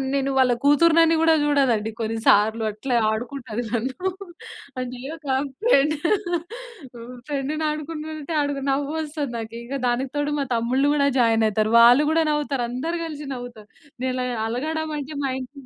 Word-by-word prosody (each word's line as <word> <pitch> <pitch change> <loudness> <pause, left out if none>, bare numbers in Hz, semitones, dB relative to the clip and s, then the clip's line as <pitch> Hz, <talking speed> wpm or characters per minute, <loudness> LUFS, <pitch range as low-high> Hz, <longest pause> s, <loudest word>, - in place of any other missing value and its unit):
నేను 275 0 0
వాళ్ళ 255 -1 +4
కూతురుని 330 +3 +5
కూడా 325 0 +5
చూడదండి 255 -7 +2
కొన్నిసార్లు. 220 0 +2
అట్లా 245 +4 -3 0.2
ఆడుకుంటది 245 0 -4
నన్ను. 260 +11 -2 0.7
అంటే 250 -1 -5 0.2
ఒక 305 - -14 0.4
ఫ్రెండ్, 305 - +4 1.3
ఫ్రెండ్‌ని 295 +2 -2
ఆడుకుంటుంటే 310 0 -5 0.4
నవ్వొస్తుంది 290 0 -2
నాకు 225 0 -6
ఇక 255 +4 -6
దానికి 250 +2 0
తోడు, 290 0 -1
మా 280 - +1
తమ్ముళ్ళు 255 +5 +1
కూడా 280 -1 +2
జాయిన్ 225 -1 +3
అవుతారు. 215 +1 0
వాళ్ళు 240 +5 +7
కూడా 325 0 +3
నవ్వుతారు. 290 -4 -1
అందరూ 320 +8 -3
కలిసి 300 -2 -7
నవ్వుతారు. 240 -4 -9 0.3
నేను 260 0 0
ఇలా 255 0 -2 0.2
అలగడం 310 +6 -3
అంటే, 290 +1 -6
మా 270 - 0
ఇం‌టిలో 270 +1 -10
275 Hz, 140 wpm, -23 LUFS, 240-300 Hz, 1.3 s, వాళ్ళు